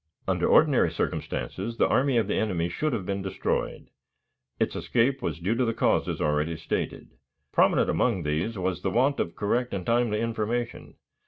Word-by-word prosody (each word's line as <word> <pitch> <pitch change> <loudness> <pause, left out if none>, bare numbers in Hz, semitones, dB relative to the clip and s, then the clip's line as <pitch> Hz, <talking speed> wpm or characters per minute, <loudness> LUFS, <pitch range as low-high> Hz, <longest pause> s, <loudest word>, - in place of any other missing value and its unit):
Under - - +1
ordinary - - +5
circumstances 115 +5 -3
the - - +4
army 130 -1 +2
of 115 - +3
the - - 0
enemy 90 -6 0
should 155 - -1
have 105 -7 -2
been 100 0 -2
destroyed. 95 0 -3 0.7
Its - - 0
escape 130 +3 +1
was 80 - -2
due 95 +6 0
to 125 +2 +1
the 115 -2 0
causes - - +1
already 75 +2 0
stated. 80 - -4 0.4
Prominent - - +3
among 105 -9 +1
these 80 +9 -1
was 95 -1 -2
the 95 - 0
want 130 +8 +2
of 85 - -2
correct 120 +3 0
and 90 -2 -4
timely 115 -1 +1
information. 115 +1 -3
105 Hz, 170 wpm, -27 LUFS, 90-120 Hz, 0.7 s, ordinary